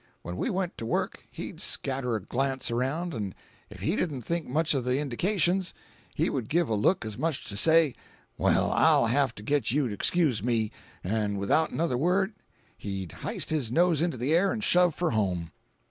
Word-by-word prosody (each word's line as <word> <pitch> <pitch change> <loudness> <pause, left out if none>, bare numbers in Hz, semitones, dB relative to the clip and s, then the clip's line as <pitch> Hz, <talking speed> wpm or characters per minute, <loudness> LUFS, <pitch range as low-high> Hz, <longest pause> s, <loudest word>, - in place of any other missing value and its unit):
When 85 - -5
we - - -1
went 185 -1 -2
to 115 - -4
work, - - -2
he'd - - -7
scatter 130 -3 -1
a 110 - -2
glance 130 +2 -1
around, 140 +9 -1
'n' 100 -6 -4 0.3
if - - -12
he 165 - 0
didn't 145 - -2
think 170 +2 -2
much 155 +5 +1
of 135 -3 -1
the 125 +1 0
indications, 175 - 0 0.4
he - - +1
would 125 -5 -3
give 170 -2 +1
a - - +1
look 110 - +2
as 110 +1 -6
much 160 -1 -1
as - - -5
to - - -5
say, 160 +2 +6 0.4
'Well, - - +2
I'll - - +4
have 130 +1 +1
to 105 - -10
get 140 0 +1
you 135 +1 +1
to - - -4
excuse 145 - +1
me,' 115 -2 0 0.3
'n' 105 +1 -1
without 130 +11 +2
another 155 -7 -1
word 190 +7 +1 0.5
he'd 95 -4 -5
hyste - - -2
his 140 -8 -1
nose 170 +1 +3
into 170 -5 0
the 130 +6 0
air 185 +3 +3
'n' 220 - -3
shove 180 -5 +4
for 175 -2 0
home. 90 -7 -1
135 Hz, 200 wpm, -28 LUFS, 110-170 Hz, 0.5 s, say